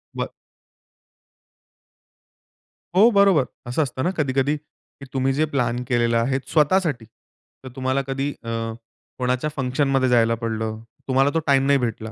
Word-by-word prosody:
बरं. -, -, -3 dB, 2.6 s
हो, 210 Hz, +5 st, +7 dB
बरोबर. 195 Hz, -8 st, +5 dB, 0.3 s
असं 140 Hz, +6 st, +1 dB
असतं 130 Hz, -1 st, -4 dB
ना -, -, +2 dB
कधी-कधी, 140 Hz, -1 st, +1 dB
की 145 Hz, -1 st, -18 dB
तुम्ही 135 Hz, 0 st, +1 dB
जे 155 Hz, +3 st, +1 dB
प्लॅन 125 Hz, -2 st, 0 dB
केलेला 120 Hz, -2 st, +2 dB
आहे 135 Hz, +3 st, 0 dB
स्वतःसाठी 155 Hz, -5 st, +2 dB, 0.6 s
तर 130 Hz, -, -8 dB
तुम्हाला 130 Hz, +1 st, 0 dB
कधी 135 Hz, +1 st, -2 dB
अ, 115 Hz, -, -6 dB, 0.7 s
कोणाच्या 125 Hz, +3 st, 0 dB
फंक्शनमध्ये 135 Hz, 0 st, +1 dB
जायला 115 Hz, -1 st, +3 dB
पडलं. 110 Hz, -1 st, -3 dB, 0.3 s
तुम्हाला 135 Hz, +1 st, +3 dB
तो 165 Hz, -, +2 dB
टाईम 135 Hz, -1 st, +4 dB
नाही 140 Hz, 0 st, +5 dB
भेटला. 110 Hz, -2 st, -3 dB
135 Hz, 135 wpm, -22 LUFS, 120-145 Hz, 2.6 s, हो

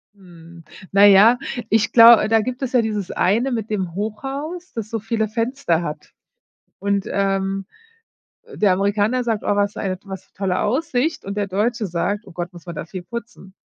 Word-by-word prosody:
Hm, 170 Hz, -3 st, -15 dB, 0.3 s
na 200 Hz, +1 st, +7 dB
ja, 205 Hz, +5 st, +7 dB, 0.3 s
ich 220 Hz, 0 st, +2 dB
glau 230 Hz, -1 st, +8 dB
da 225 Hz, 0 st, +4 dB
gibt 250 Hz, +4 st, -4 dB
es 260 Hz, -, -2 dB
ja 250 Hz, -, +4 dB
dieses 210 Hz, -4 st, -3 dB
eine 230 Hz, +8 st, +1 dB
mit 225 Hz, -3 st, -3 dB
dem 190 Hz, -5 st, -2 dB
Hochhaus, 275 Hz, -, -5 dB
das 220 Hz, -2 st, -5 dB
so 225 Hz, 0 st, -3 dB
viele 220 Hz, 0 st, -1 dB
Fenster 230 Hz, -5 st, -1 dB
hat 150 Hz, -1 st, -7 dB, 0.7 s
und, 200 Hz, 0 st, -1 dB
ähm, 195 Hz, 0 st, -1 dB, 0.8 s
äh, 465 Hz, -1 st, -14 dB
der 200 Hz, -3 st, +3 dB
Amerikaner 205 Hz, +6 st, +1 dB
sagt: 225 Hz, -3 st, -2 dB
„Oh, 205 Hz, -, +1 dB
was 205 Hz, 0 st, +1 dB
für -, -, -8 dB
eine 185 Hz, -2 st, -2 dB
was 190 Hz, -2 st, -8 dB
'ne -, -, -42 dB
tolle 185 Hz, -2 st, -1 dB
Aussicht 265 Hz, +5 st, -1 dB
und 200 Hz, +1 st, -6 dB
der 200 Hz, -1 st, -1 dB
Deutsche 210 Hz, +2 st, -1 dB
sagt: 200 Hz, +5 st, -2 dB
„Oh 190 Hz, -, -13 dB
Gott, 175 Hz, +1 st, -5 dB
muss 175 Hz, -2 st, -14 dB
man 170 Hz, -1 st, -7 dB
da -, -, -4 dB
viel 185 Hz, +2 st, -7 dB
putzen.“ 225 Hz, -2 st, -9 dB
205 Hz, 195 wpm, -21 LUFS, 190-235 Hz, 0.8 s, glau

